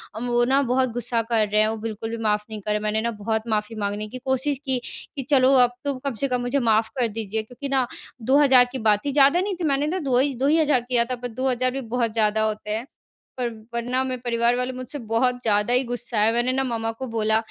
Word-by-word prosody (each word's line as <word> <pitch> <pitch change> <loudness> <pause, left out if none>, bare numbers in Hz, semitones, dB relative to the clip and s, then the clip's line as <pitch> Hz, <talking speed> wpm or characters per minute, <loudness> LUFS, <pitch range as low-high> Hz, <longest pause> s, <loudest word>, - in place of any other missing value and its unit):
और 220 - -5
वो 240 0 +3
न 275 +1 +4
बहुत 255 +1 +2
गुस्सा 240 -1 -1
कर 220 -2 +3
रहे 210 +1 +3
हैं। 215 - +3
वो 225 - -3
बिल्कुल 220 0 -5
भी 230 - -4
माफ़ 210 -1 +1
नहीं 215 -1 -6
कर 205 - -6
रहे 210 - +2
हैं। 210 - -6
मैंने 215 +1 0
न - - -2
बहुत 220 +1 -1
माफ़ी 215 0 -1
माँगने 205 +1 -2
की 255 - -7
कोशिश 265 +1 0
की, 260 -2 0 0.4
कि 275 - -4
चलो 270 -2 +5
अब 245 - -3
तो 280 - 0
कम 275 - -1
से - - +3
कम 250 -2 -1
मुझे 245 +3 0
माफ़ 220 0 +3
कर 240 - +3
दीजिए। 220 0 -4
क्योंकि 250 +5 -8
न 260 -2 +3 0.4
2000 265 -1 +6
की 260 - -4
बात 210 +3 +2
थी। 285 - 0
ज़्यादा 280 +4 +5
नहीं 390 0 -2
थी, 350 - -6
मैंने 285 -1 +1
तो 365 +4 -1
दो 245 - +4
ही 275 +1 +2
2 265 +3 0
ही 315 +3 +4
हज़ार 290 -5 +3
किया 235 -2 +3
था 255 - -3
पर 245 0 -6
2000 255 +1 -1
भी 270 +1 -4
बहुत 235 -2 -1
ज़्यादा 220 -1 +2
होते 215 -1 -3
हैं। 225 +4 -3 0.5
पर 245 -1 0 0.2
वरना 245 +2 -1
मेरे 255 -2 -4
परिवार 235 0 +2
वाले 250 +1 -1
मुझसे 255 +3 -7
बहुत 245 +2 +1
ज़्यादा 210 +1 +1
ही 250 +2 +3
गुस्सा 240 -2 -3
हैं। 215 +2 +4
मैंने 240 +2 +1
न, 265 - +1
मम्मा 225 -2 -2
को 260 +4 -7
बोला, 220 -1 +1
245 Hz, 260 wpm, -24 LUFS, 220-260 Hz, 0.5 s, 2000